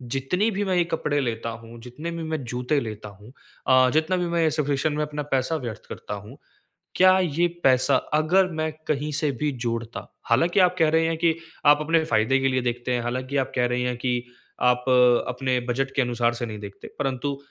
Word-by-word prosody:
जितनी 180 +12 0
भी 205 0 -2
मैं 190 -1 0
ये 175 - +4
कपड़े 155 -3 -1
लेता 115 -2 -3
हूँ, 115 +1 -10
जितने 135 +8 -7
भी 165 -1 -5
मैं 160 -3 -3
जूते 125 +4 -1
लेता 110 -4 -7
हूँ 105 +5 -16 0.3
अ, 130 -1 +5
जितना 160 +4 +1
भी 180 - -1
मैं 170 0 0
ये 160 - +2
सफीशन 145 0 0
में 150 +1 -1
अपना 150 0 -4
पैसा 130 +5 0
व्यर्थ 120 -8 -6
करता - - -7
हूँ। 105 +6 -9 0.6
क्या 185 0 +6
ये 175 -1 +1 0.2
पैसा 130 +1 +4 0.2
अगर 175 +5 +3
मैं 155 -1 -2 0.2
कहीं 150 0 -1
से 150 0 0
भी 150 -1 +1
जोड़ता 115 0 -4 0.2
हालाँकि 165 +11 +3
आप 180 0 +3
कह 160 -1 +4
रहे 160 +1 +2
हैं 165 0 -1
कि 165 0 +2 0.3
आप 145 0 +6
अपने 160 +1 +2
फ़ायदे 135 -2 +2
के 135 - +1
लिए 130 -1 +1
देखते 120 0 -2
हैं, 120 - 0
हालाँकि 130 +3 -3
आप 135 - -1
कह 125 -1 +2
रहे 125 0 -1
है 125 0 -1
कि 125 +1 -1 0.6
आप 125 0 0 0.4
अपने 125 0 -1
बजट 135 +2 -1
के 135 - +3
अनुसार 120 -1 0
से 120 +1 -4
नहीं 110 -2 -7
देखते। 100 -1 -10
परंतु 140 0 -2
135 Hz, 210 wpm, -24 LUFS, 125-160 Hz, 0.6 s, क्या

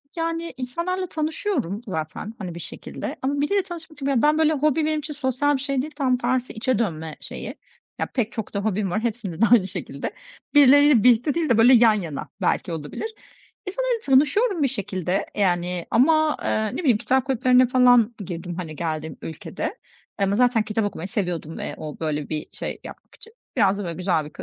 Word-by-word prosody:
Yani, 330 0 -2
insanlarla 340 +9 -3
tanışıyorum 310 - -2
zaten, 160 +4 -4
hani, 180 -5 -6
bir - - -6
şekilde - - -6
ama 280 +2 0
biriyle 390 +7 +1
tanışmak 330 -4 -10
için 275 -3 +1
ben, 300 +1 +4
böyle, 315 0 +3
hobi 305 +1 +1
benim 310 0 0
için 300 +1 -6
sosyal 285 +1 +1
bir 265 - -3
şey 275 -1 -1
değil. 305 +3 -7
Tam 260 -4 +1
tersi 250 +1 -1
içe 245 0 0
dönme 160 -8 -2
şeyi, - - -7 0.4
ya, - - +1
pek 235 -4 0
çok 220 -2 -6
da 200 - -1
hobim 200 -2 -1
var, 215 - 0
hepsinde 220 -6 -3
de - - +7
aynı 215 -6 +6
şekilde. 185 - -5 0.4
Birileriyle 285 -4 +7
birlikte 245 +3 +4
değil 330 -1 -1
de, 235 - +4
böyle, 235 +3 +7
yan 230 -2 +7
yana 170 -9 -4
belki 180 - 0
olabilir. 160 - -5 0.6
İnsanlarla - - -1
tanışıyorum 305 - +3
bir - - +4
şekilde, 190 -7 -3 0.2
eee, 210 - -1
yani, 175 -2 +1
ama, 310 +5 +4
eee, 220 - 0
ne - - -4
bileyim, 265 -11 +3
kitap 260 +4 +1
kulüplerine 255 -1 +4
falan 245 -2 +5
girdim, 175 -1 -5
hani, 165 -3 -6
geldiğim 155 -2 -4
ülkede 160 - -5 0.4
ama 195 0 +1
zaten 245 -1 +3
kitap 215 0 -1
okumayı 185 -3 -4
seviyordum 175 - -3
ve - - -5
o, 155 -2 -7
böyle, 150 -2 -2
bir 155 -1 -3
şey - - -5
yapmak - - -12
için 450 - -13 0.2
biraz 200 0 +4
da, - - -3
böyle, 170 -2 -4
güzel 180 -4 0
bir 150 - -10
240 Hz, 190 wpm, -23 LUFS, 185-290 Hz, 0.6 s, de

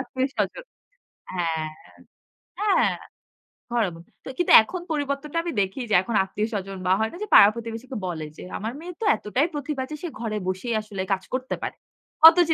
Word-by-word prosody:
আত্মীয়স্বজন 265 - -2 0.7
হ্যাঁ, 175 -2 -1
হ্যাঁ। 155 -1 -2 0.9
হ্যাঁ, 415 -1 +3 0.8
horrible 190 -9 -1 0.2
তো - - -6
কিন্তু 355 - +1
এখন 360 +10 -6
পরিবর্তনটা 290 +1 -2
আমি 340 - -3
দেখি 195 +6 -2
যে - - 0
এখন 225 +4 -4
আত্মীয়স্বজন 195 -1 -3
বা - - +3
হয় 220 0 +1
না - - -10
যে - - -4
পাড়া-প্রতিবেশীকে 230 +4 +4
বলে 165 -4 -4
যে, - - -9
"আমার 220 +3 -4
মেয়ে 350 +3 -7
তো - - -1
এতটাই 255 +9 0
প্রতিভা 290 -1 -3
আছে, 305 - -7
সে - - -2
ঘরে 220 -2 -2
বসেই 190 +6 -2
আসলে 210 -3 -6
কাজ 190 -1 -2
করতে 255 0 -2
পারে।" - - -4 0.5
অত 325 +2 +8
জি 325 - +3
235 Hz, 170 wpm, -25 LUFS, 195-290 Hz, 0.9 s, অত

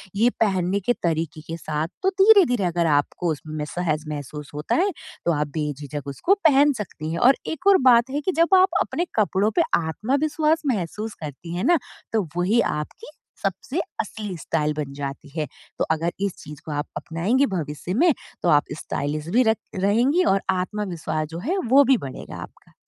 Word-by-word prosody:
ये 225 +4 +4
पहनने 190 -2 +2
के 225 +5 +1
तरीक़े 160 -2 -1
के 165 0 -4
साथ, 155 0 -2 0.2
तो 380 - +4
धीरे-धीरे 385 - +5
अगर 170 -1 +1
आपको 150 +3 +1
उसमें 155 0 -5
सहज 155 -1 -2
महसूस 150 0 -6
होता 150 +1 -1
है, 390 +4 +2 0.3
तो 170 - +3
आप 150 0 0
बेझिझक 145 -1 -4
उसको 235 - +1
पहन 285 0 +5
सकती 165 -8 -6
हैं। 170 - -2
और 260 +3 +6
एक 320 +5 -3
और 395 -1 +8
बात 235 +2 +4
है 290 +2 -1
कि 375 - 0
जब 335 +3 +5
आप 375 +1 +5
अपने 345 - -1
कपड़ों 210 0 +2
पे - - +7 0.2
आत्मविश्वास 290 - 0
महसूस 210 +3 -4
करती 155 +3 -7
हैं 180 - -2
ना, 345 0 +5 0.4
तो 215 -6 +1
वही 205 +7 +3
आपकी 150 0 -4 0.4
सबसे 210 - -2 0.2
असली 210 -3 -6
स्टाइल 150 -1 -1
बन 145 -2 -4
जाती 140 +1 -6
है। 150 - 0 0.3
तो - - +3
अगर 165 +2 0
इस 200 -2 0
चीज़ 150 -1 -10
को 155 - -6
आप 145 +1 -2
अपनाएँगी 205 +12 +1
भविष्य 155 +1 -4
में, 335 +4 +4 0.3
तो 175 - +3
आप 145 -1 +5 0.2
स्टाइलिस्ट 150 +2 -3
भी 255 - +6
र 220 - +4 0.2
रहेंगी 235 - +3
और 195 - +1
आत्मविश्वास 180 -5 -2
जो 165 - -5
है 380 +3 +1
वो 280 +2 +7
भी 260 -1 +5
बढ़ेगा 135 -8 -8
आपका। - - -13
180 Hz, 185 wpm, -23 LUFS, 155-250 Hz, 0.4 s, और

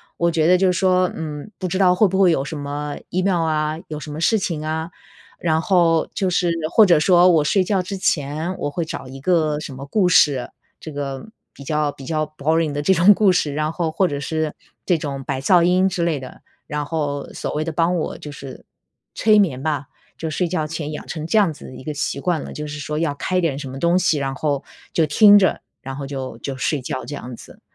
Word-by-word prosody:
我 170 0 +1
觉 160 0 +2
得 180 - +6
就 190 +1 +3
是 - - -1
说， 185 -1 +3
嗯， 150 +3 -6
不 185 - -3
知 185 - -2
道 185 -2 +5
会 205 +3 +4
不 190 +1 -1
会 185 -3 +6
有 135 -4 +1
什 155 +2 -5
么 145 +1 -4
Email 185 -1 +1
啊， 155 -1 0
有 150 -1 -5
什 150 - -8
么 150 - -6
事 220 +7 +3
情 165 -6 -3
啊， 160 +2 -3 0.5
然 160 -1 +1
后 170 -4 +2
就 190 -2 0
是 175 -1 +1 0.2
或 215 +4 +6
者 170 -5 +5
说 180 +2 +5
我 160 -3 +4
睡 190 +5 +2
觉 190 0 +1
之 190 +2 -5
前， 155 +1 -1
我 - - -2
会 170 +4 -3
找 160 -4 -6
一 135 +1 -10
个 155 -2 +2
什 140 - -7
么 135 +2 -8
故 185 +4 +2
事， 145 -5 +4 0.3
这 155 - -9
个 140 -2 -5 0.3
比 140 - -12
较 150 +1 0
比 135 - -12
较 155 0 -1
boring 160 +1 +1
的 145 - -2
这 190 +5 +3
种 180 +4 +6
故 200 -1 +4
事， 150 -5 0
然 155 +1 -1
后 165 -1 -2
或 185 +3 +1
者 145 - -3
是 155 +1 -2 0.3
这 175 -3 +2
种 140 -3 -5
白 135 0 -3
噪 175 +5 +4
音 185 +2 +3
之 180 -2 -1
类 160 -4 0
的， 130 - -11 0.3
然 150 0 -2
后 145 -2 -3
所 - - -4
谓 150 - -1
的 165 - -3
帮 170 +2 +1
我 165 - -3
就 150 - -9
是 140 -2 -10 0.5
催 215 -1 +4
眠 145 -10 +1
吧。 145 -3 -2 0.3
就 160 - -3
睡 175 +2 -1
觉 160 -4 -1
前 155 -1 -5
养 150 - -7
成 155 -2 -5
这 195 +7 +1
样 185 -7 +2
子 - - -14
的 - - -10
一 - - -10
个 150 +2 -5
习 140 -1 -2
惯 170 0 0
了， - - -8
就 150 0 -6
是 150 - -6
说 150 +1 -3
要 150 -4 -1
开 185 +5 -2
一 - - +2
点 155 -5 0
什 140 -2 -6
么 135 +1 -7
东 170 +1 +3
西， 165 -4 +2
然 135 -1 -2
后 145 -2 -1 0.3
就 160 - +2
听 205 +7 +7
着， 190 -3 +1 0.2
然 135 0 -6
后 140 0 -5
就 135 -2 -6
就 135 -2 -5
睡 140 +2 -1
觉 130 +1 -5
这 145 - -6
样 125 -4 -8
子， - - -15
155 Hz, 285 characters per minute, -21 LUFS, 145-180 Hz, 0.5 s, 听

